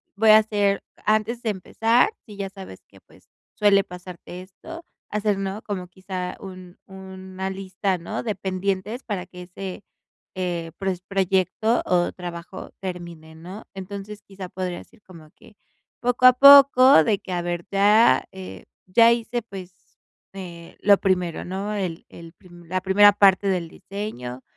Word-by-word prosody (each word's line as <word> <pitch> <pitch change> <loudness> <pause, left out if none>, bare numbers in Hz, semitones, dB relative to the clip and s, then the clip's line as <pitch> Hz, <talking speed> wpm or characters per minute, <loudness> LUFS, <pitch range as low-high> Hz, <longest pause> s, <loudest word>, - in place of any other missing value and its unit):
voy 220 +2 +3
a 215 - +9
hacer 205 -2 0 0.2
antes 215 +3 0
de 225 - -1
empezar, 225 - +1 0.2
si 210 -3 -12
ya 195 -1 -4
sabes 190 - -12
que, - - -20
pues, - - -24 0.3
suele 200 -1 +4
pasarte 180 0 -10
esto, 325 - -11 0.3
hacer, 210 -1 -1
¿no?, 195 +2 -4
como 185 -4 -5
quizá 185 0 -6
un 185 -2 -11
una 190 0 -8
lista 190 0 -3
¿no?, 180 +6 -5
de 215 -3 -2
pendientes 195 +4 -3
para 195 -5 -4
que 180 0 -11
ese, 185 +2 -8 0.5
eh, 175 -3 -3
pues, 190 -2 -3
proyecto 195 +3 0
o 175 -1 +1
trabajo 175 0 -9
termine, 170 -4 -8
¿no? 180 +6 -10
Entonces, 200 +2 -8
quizá 195 -3 -10
podrías 180 -1 -6
ir 230 - -22
como 165 -4 -15
que 210 - -19 0.4
poco 245 +1 0
a 255 - +8
poco, 270 - +8
de 205 +4 +1
que 190 - -10
a 175 -1 -1
ver, 175 0 -4
ya, 210 +4 +4
eh, 190 -1 -10 0.2
ya 230 +5 +5
hice, 235 +1 -1
pues, 190 -4 -10 0.6
eh, 175 -3 -10
lo 200 -1 +5
primero, 180 -3 -1
¿no? 195 +3 -4
El 185 -5 -4
el 165 -1 -13
prim 175 0 -17
la 185 +1 -2
primera 205 +2 +6
parte 200 -1 +4
del 180 -4 -1
diseño, 145 - -7
190 Hz, 155 wpm, -23 LUFS, 180-210 Hz, 0.6 s, a